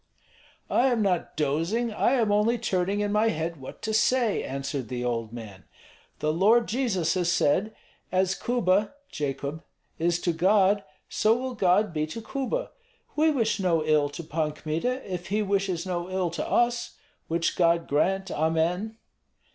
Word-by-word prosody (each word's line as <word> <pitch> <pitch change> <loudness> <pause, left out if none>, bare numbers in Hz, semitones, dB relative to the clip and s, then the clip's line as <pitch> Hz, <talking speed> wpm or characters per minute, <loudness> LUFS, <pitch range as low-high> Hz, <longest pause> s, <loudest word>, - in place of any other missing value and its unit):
"I 255 - +4
am 240 -4 +2
not 180 -4 -1
dozing, 165 +11 0
I 235 - +2
am 230 -5 +2
only 210 +4 +3
turning 200 -2 0
in 205 0 -1
my 210 +2 +3
head 165 -2 -3
what 130 - -10
to 220 - -2
say," 230 0 +2
answered 135 -1 -4
the 125 +1 -4
old 115 -2 -2
man. 105 -7 -10 0.5
"The 155 0 0
Lord 215 +7 +4
Jesus 205 -10 0
has 175 -2 +1
said, 180 +7 +1 0.4
'As 185 0 +2
Kuba 210 0 +1
[Jacob] 145 +2 -4 0.4
is 170 +1 +1
to 175 - 0
God, 195 +3 +3 0.2
so 220 +2 +2
will 260 0 -4
God 195 -2 +2
be 155 -1 -1
to 155 - -6
Kuba.' 275 - -3 0.4
We 315 +1 +4
wish 230 -8 +1
no 170 -5 +1
ill 150 -2 +3
to 155 +4 -7
Pan 155 -1 -2
Kmita, 165 - -2
if 180 -2 -5
he 210 +3 0
wishes 195 -3 -1
no 175 -1 -3
ill 185 -2 -1
to 170 - -4
us, 240 0 +1 0.3
which 165 +1 0
God 170 -1 +2
grant, 190 +6 +1
amen." 165 +7 0
185 Hz, 165 wpm, -26 LUFS, 160-220 Hz, 0.5 s, I